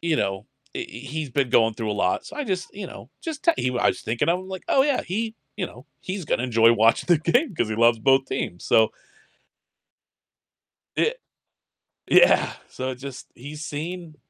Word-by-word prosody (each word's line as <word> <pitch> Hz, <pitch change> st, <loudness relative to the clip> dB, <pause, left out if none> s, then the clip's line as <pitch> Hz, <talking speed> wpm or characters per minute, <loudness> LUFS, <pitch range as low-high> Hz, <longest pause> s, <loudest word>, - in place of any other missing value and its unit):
you 165 Hz, -2 st, +1 dB
know, 95 Hz, -4 st, -2 dB, 0.3 s
i -, -, -4 dB
he's 140 Hz, +5 st, -5 dB
been 135 Hz, -1 st, 0 dB
going 115 Hz, -1 st, +4 dB
through 110 Hz, -1 st, -3 dB
a -, -, +1 dB
lot, 90 Hz, -, +1 dB
so 305 Hz, -, -10 dB
I 295 Hz, -, -2 dB
just, 185 Hz, -6 st, -3 dB
you 200 Hz, -, -6 dB
know, -, -, -11 dB
just 320 Hz, -3 st, -6 dB
te 335 Hz, -, +6 dB
he 125 Hz, -1 st, 0 dB
I -, -, +3 dB
was -, -, -1 dB
thinking 115 Hz, +7 st, -1 dB
of 175 Hz, -, +2 dB
him 185 Hz, -, -11 dB
like, 190 Hz, -2 st, -7 dB
"Oh 265 Hz, -, +5 dB
yeah, 280 Hz, -1 st, +1 dB
he 220 Hz, +5 st, -3 dB, 0.2 s
you 185 Hz, -, -2 dB
know, 125 Hz, +3 st, -14 dB, 0.2 s
he's 185 Hz, -1 st, -5 dB
gonna 125 Hz, -, 0 dB
enjoy 115 Hz, -2 st, +5 dB
watching 115 Hz, 0 st, +3 dB
the 175 Hz, -3 st, +5 dB
game 240 Hz, -, +1 dB
'cause 120 Hz, -, 0 dB
he 110 Hz, -, -2 dB
loves 115 Hz, 0 st, +4 dB
both 135 Hz, +3 st, +4 dB
teams," 90 Hz, -9 st, -4 dB
so 110 Hz, -1 st, +4 dB, 2.1 s
It -, -, +1 dB, 0.9 s
Yeah. -, -, +5 dB, 0.2 s
So 130 Hz, 0 st, -4 dB
just, 130 Hz, 0 st, -9 dB
he's 150 Hz, +5 st, -9 dB
seen 160 Hz, +2 st, -6 dB
145 Hz, 195 wpm, -24 LUFS, 120-185 Hz, 2.1 s, te